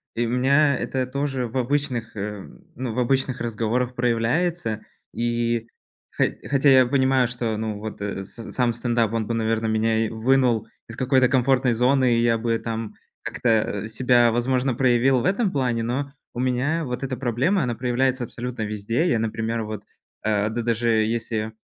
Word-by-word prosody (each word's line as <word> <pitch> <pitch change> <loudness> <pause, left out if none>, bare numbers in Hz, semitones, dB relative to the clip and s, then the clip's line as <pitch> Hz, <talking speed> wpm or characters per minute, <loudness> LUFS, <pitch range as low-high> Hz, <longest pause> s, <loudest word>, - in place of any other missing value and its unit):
И 120 - 0
у - - -2
меня 140 +4 +3
это 130 -1 -2
тоже 135 -1 -2
в 120 +3 -5
обычных, 130 -2 -1
э, 105 0 -4 0.3
ну 125 -2 -4
в 125 - -2
обычных 130 +1 0
разговорах 120 +2 -1
проявляется. 120 +1 0 0.3
И 120 -1 -1 0.5
хо - - +2 0.3
хотя 140 +1 +3
я 130 -1 +7
понимаю, 130 -1 +3
что 120 -2 -2
ну 110 -1 -3
вот 110 -1 -7
с 100 +3 -6
сам 120 -2 +1
стендап, 115 -2 0
он 110 -2 -1
бы, 115 - -1
наверное, 110 0 0
меня 110 +1 +1
и - - -3
вынул 120 -1 +2 0.2
из 115 - -7
какой-то 130 +1 +3
комфортной 130 0 +2
зоны, 125 +1 +3
и - - +2
я 115 -1 +3
бы 115 0 0
там 115 -2 -4 0.3
как-то, 110 -4 0
а, - - -5
себя, 120 +1 +3
возможно, 125 +2 +1
проявил 125 +1 +3
в - - -3
этом 200 +1 +1
плане. 125 -6 0
Но 135 +4 -3 0.2
у - - -6
меня 130 +6 0
вот 125 0 -4
эта 130 -1 -3
проблема, 130 - +1
она 120 -2 -1
проявляется 125 +2 0
абсолютно 120 0 -6
везде. 110 - -1
Я, 115 - +2
например, 115 +1 -2
вот, 105 -1 -6 0.4
э, 105 -1 +1
д 115 +2 -2
даже 115 0 0
если 110 0 0
120 Hz, 175 wpm, -23 LUFS, 115-130 Hz, 0.5 s, я